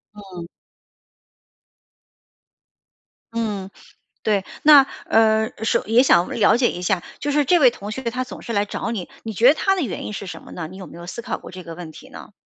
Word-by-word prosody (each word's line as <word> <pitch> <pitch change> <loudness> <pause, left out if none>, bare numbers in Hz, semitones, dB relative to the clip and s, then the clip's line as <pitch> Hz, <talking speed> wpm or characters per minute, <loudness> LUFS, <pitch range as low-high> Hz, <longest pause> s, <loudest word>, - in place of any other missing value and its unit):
嗯。 185 -4 -9 2.9
嗯， 210 -4 -3 0.5
对， 205 -3 +1 0.2
那， 290 -3 +8 0.2
呃 220 0 +3
首 - - +1
也 225 +4 +5
想 175 -9 +4
了 220 - +3
解 245 -1 +2
一 175 - -6
下， 180 -1 0 0.2
就 290 - -2
是 295 0 +3
这 350 +6 +4
位 265 -6 +6
同 205 -2 -8
学 260 +4 -5
他 245 +2 -2
总 255 - -8
是 235 - -6
来 205 -2 +1
找 210 - -4
你， 195 -6 -4 0.2
你 225 - -4
觉 230 +5 +5
得 285 - +7
他 390 +4 +1
的 370 - -1
原 215 - -4
因 - - -5
是 200 - -6
什 - - -8
么 - - -13
呢？ 160 -3 -6
你 190 - -11
有 190 -1 -9
没 - - -12
有 170 0 -9
思 235 - -6
考 - - -4
过 - - -11
这 185 0 -10
个 165 0 -8
问 170 -1 -8
题 155 - -13
呢？ - - -12
215 Hz, 225 characters per minute, -22 LUFS, 185-245 Hz, 2.9 s, 那